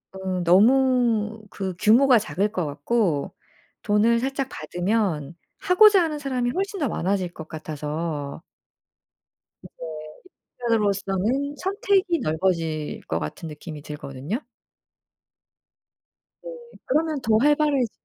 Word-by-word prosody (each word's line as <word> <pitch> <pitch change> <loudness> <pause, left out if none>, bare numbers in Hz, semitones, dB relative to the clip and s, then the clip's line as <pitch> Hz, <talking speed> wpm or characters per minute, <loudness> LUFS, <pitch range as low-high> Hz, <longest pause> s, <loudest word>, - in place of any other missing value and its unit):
음 190 -1 -3
너무 225 +2 +3
그 190 -2 -4
규모가 245 +4 +6
작을 205 0 -1
것 180 -6 -2
같고 150 +2 -1 0.5
돈을 220 +2 +3
살짝 270 +2 -2
받으면 175 -5 -2 0.2
하고자 395 +1 +6
하는 310 -2 -2
사람이 260 -4 -1
훨씬 395 +1 -2
더 290 - +1
많아질 190 -3 -1
것 160 -2 -9
같아서 155 -1 -5 1.2
그게 - - -13 0.9
한편으로써는 225 +4 0
선택이 380 -2 +1
넓어질 160 -2 -1
것 80 - -1
같은 75 - -6
느낌이 150 0 -8
들거든요. 150 - -5 2.0
네. - - -7 0.4
그러면 310 +1 0
더 220 -2 +3
활발해지 290 -2 +2
210 Hz, 235 characters per minute, -24 LUFS, 165-270 Hz, 2.0 s, 규모가